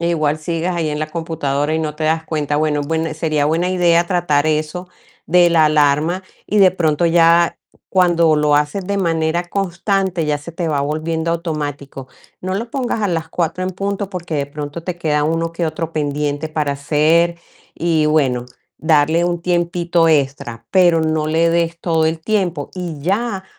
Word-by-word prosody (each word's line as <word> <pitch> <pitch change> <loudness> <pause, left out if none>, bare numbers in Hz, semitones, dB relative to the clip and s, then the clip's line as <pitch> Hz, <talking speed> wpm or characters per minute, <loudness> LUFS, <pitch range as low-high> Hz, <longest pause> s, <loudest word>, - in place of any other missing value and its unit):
Eh, 170 0 0
igual 155 -2 0
sigues 165 +3 -2
ahí 170 -3 -1
en 150 0 -3
la 155 - -2
computadora 155 -3 -2
y 160 - +1
no 155 -2 -3
te 155 - -3
das 160 +1 +1
cuenta. 150 -2 -2
Bueno, 150 -1 0
buen 160 +1 -2
sería 155 -2 0
buena 165 +4 +1
idea 175 -2 +3
tratar 170 -5 +1
eso 155 +4 -2 0.4
de 175 0 +4
la 160 -2 +5
alarma, 150 +4 +2 0.2
y 210 - -1
de 190 -2 +7
pronto 165 -3 0
ya 170 0 +4 0.3
cuando 170 -4 +3
lo 150 -1 +3
haces 150 +6 -1
de 200 +1 -1
manera 165 -1 0
constante 190 -1 -1
ya 150 -1 0
se 155 +4 -10
te 165 0 -3
va 145 -2 0
volviendo 160 +3 -2
automático. 145 -5 -4 0.3
No 185 +1 -3
lo 230 +4 -4
pongas 250 -5 -2
a 205 - +1
las 165 -2 -2
4 170 +2 -2
en 185 - -2
punto, 200 +1 -3
porque 175 -4 -5
de 140 -1 -1
pronto 145 +2 -7
te 180 -1 -4
queda 150 -3 0
uno 165 +1 -1
que 170 0 -2
otro 165 +1 -4
pendiente 145 0 -2
para 150 -2 -1
hacer. 155 +4 +2 0.4
Y 160 -2 +1
bueno, 130 -6 +1 0.3
darle 160 +2 +3
un 175 -1 -2
tiempito 175 -1 +1
extra, 135 -6 -1
pero 175 -3 +4
no 155 -1 0
le 165 +2 +2
des 170 0 0
todo 160 -2 +1
el 160 0 -2
tiempo. 180 -6 -1
Y 175 -5 -5
ya 195 +4 -1
165 Hz, 185 wpm, -18 LUFS, 150-175 Hz, 0.4 s, de